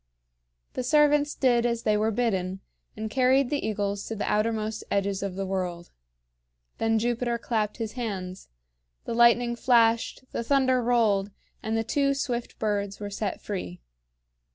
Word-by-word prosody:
The - - -2
servants 295 +1 +3
did 240 -3 +3
as 235 -1 -1
they 215 - +2
were 215 +1 +1
bidden, 195 -5 -1 0.4
and 220 0 -3
carried 260 +3 +2
the 290 - -1
eagles 205 -2 -2
to 225 - -4
the 210 - -3
outermost 215 0 -1
edges 200 -1 0
of 195 -2 -3
the 195 0 -3
world. 180 -2 -4 0.9
Then 225 0 +2
Jupiter 240 +1 0
clapped 220 -3 -2
his 225 -2 -3
hands. 195 -7 -5 0.6
The - - -3
lightning 235 0 +4
flashed, 230 -1 +2
the - - -2
thunder 260 0 +2
rolled, 220 -5 +2 0.3
and 220 +1 -1
the 225 - 0
two 275 +4 +1
swift 245 -3 -3
birds 205 -2 -2
were 205 -1 -5
set 200 -1 -4
free. 180 - -5
225 Hz, 155 wpm, -26 LUFS, 200-245 Hz, 0.9 s, lightning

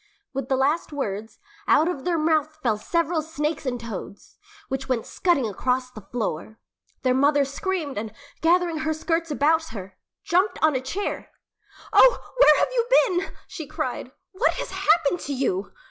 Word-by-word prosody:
With 270 -1 -4
the 265 - +3
last 285 +6 +1
words, 220 -6 -4 0.3
out 315 - +5
of 345 -7 -3
their 350 -2 +1
mouths 310 -1 +1
fell 230 -4 +2
several 335 +5 0
snakes 305 -1 -3
and 245 -1 -1
toads, 220 - -8 0.3
which 265 0 -4
went 240 -3 0
scudding 315 -10 +1
across 250 +5 -1
the 215 - -10
floor. 215 -1 -4 0.5
Their 255 -1 +3
mother 285 +2 +3
screamed 295 - -3
and, 215 0 -5 0.3
gathering 340 -1 +2
her 315 0 -1
skirts 330 +1 -1
about 315 +2 +2
her, 195 -10 -9 0.2
jumped 370 +5 +2
on 310 -3 +4
a 260 - 0
chair. 370 +11 -4 0.6
"Oh, - - +5
where - - +7
have - - +2
you 475 -2 0 0.2
been?" 375 -4 -2
she 330 -5 -7
cried. 255 0 -4 0.2
"What 395 +6 +1
has - - -5
happened 335 +1 +2
to 285 - -4
you?" 200 -7 -1
290 Hz, 165 wpm, -24 LUFS, 250-330 Hz, 0.6 s, where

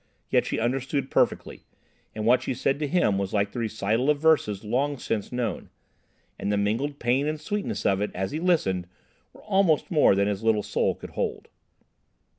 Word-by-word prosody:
Yet - - +3
she - - -2
understood 130 +3 -1
perfectly, - - 0 0.5
and 110 0 -3
what 125 +2 +4
she 130 - -3
said 135 +3 0
to 150 - -1
him 135 - +2
was 100 -1 -3
like 100 0 +1
the 120 - -5
recital 110 +3 0
of 150 - +3
verses 145 -11 +2
long 135 +7 0
since 110 -4 -3
known. 125 -1 -3 0.7
And 100 - -1
the 105 - +1
mingled 115 +8 -1
pain 130 +4 +1
and 155 0 -2
sweetness 205 +4 -3
of 95 0 +2
it 105 - 0
as 95 +1 -2
he 155 - -3
listened 95 - +1 0.4
were - - -17
almost 190 -7 +2
more 150 - +5
than 100 +1 +2
his 100 -1 -2
little 110 -2 +2
soul - - 0
could - - -10
hold. - - -3
120 Hz, 190 wpm, -26 LUFS, 105-145 Hz, 0.7 s, more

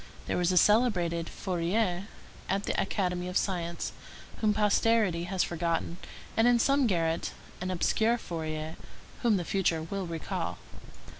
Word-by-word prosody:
There - - -1
was 175 0 +2
a 180 - +2
celebrated 180 -7 +3
Fourier 185 +1 -1 0.4
at 195 +1 +1
the - - -1
Academy 180 -3 -1
of 180 - 0
Science, 170 -3 -2 0.5
whom 215 -1 +2
posterity 210 -3 +2
has 185 0 0
forgotten; 170 0 -1 0.4
and 225 +2 +4
in 245 0 +5
some 275 +2 +3
garret 165 -4 0 0.3
an 180 - -2
obscure 220 +6 +2
Fourier, 160 -5 -4 0.4
whom 230 -4 +3
the 175 - -3
future 170 -4 +1
will 190 +2 -4
recall. 165 -1 -3
180 Hz, 140 wpm, -29 LUFS, 170-210 Hz, 0.5 s, in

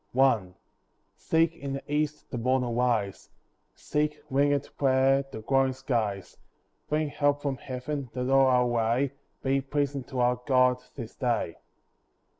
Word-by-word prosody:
I 125 -8 +4 0.7
See 160 0 +2
in 165 -4 -3
the 135 - -5
east 150 +1 -2
the 125 - -3
morn 130 +2 +2
arise; 120 -4 -1 0.5
Seek, 150 0 -1
wingèd 140 +1 +1
prayer, 135 0 +3
the 110 - -7
glowing 135 +2 +2
skies; 110 -8 -2 0.5
Bring 150 0 0
help 145 0 +1
from 140 -2 -1
Heaven, 130 +2 -5
that 125 0 -2
all 135 0 +5
our 125 -1 +4
way 120 +3 +1 0.3
Be 135 +1 +2
pleasing 140 0 -2
to 130 -2 -5
our 125 0 +2
God 125 -2 +4
this 115 -5 -8
day. 120 - -1
130 Hz, 140 wpm, -28 LUFS, 125-140 Hz, 0.7 s, all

